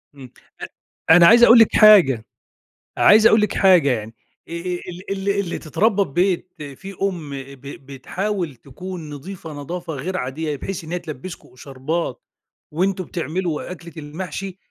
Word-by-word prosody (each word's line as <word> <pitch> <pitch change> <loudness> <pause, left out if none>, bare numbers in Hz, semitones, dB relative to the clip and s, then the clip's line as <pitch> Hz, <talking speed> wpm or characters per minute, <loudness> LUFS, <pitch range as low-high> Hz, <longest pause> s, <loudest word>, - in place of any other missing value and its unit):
إمم. 130 -3 -12 0.8
أ 160 - +8
أنا 175 -1 +7
عايز 235 +4 +7
أقول 235 0 +8
لِك 225 - +4
حاجة، 175 - +6 0.7
عايز 215 +1 +6
أقول 220 - +4
لك 210 - 0
حاجة 180 -7 +5
يعني، 110 -2 -4 0.4
آآ، - - -7
آآ - - -3 0.3
ال 180 +3 -9
ال 195 0 -2
اللي 180 -4 -3
تتربّى 200 - +1
في 170 - -10
بيت 180 +3 -1 0.3
فيه 195 +1 -9 0.2
أم 165 -6 -8
ب 140 -1 -9
ب 140 -1 -11
بتحاول 175 +4 -4
تكون 160 +6 -9
نظيفة 160 +1 -9
نضافة 170 +4 -6
غير 180 +7 -4
عادية 150 +3 -4
بحيث 175 +5 -6
إن 160 - -10
هي 180 - -2
تلبّسكم 155 +3 -9
إشاربات 135 +3 -5 0.5
وأنتم 185 +3 -1
بتعملوا 170 0 -4
أكلة 170 -1 -10
المحشي، 180 +5 -7
170 Hz, 160 wpm, -21 LUFS, 140-190 Hz, 0.8 s, أ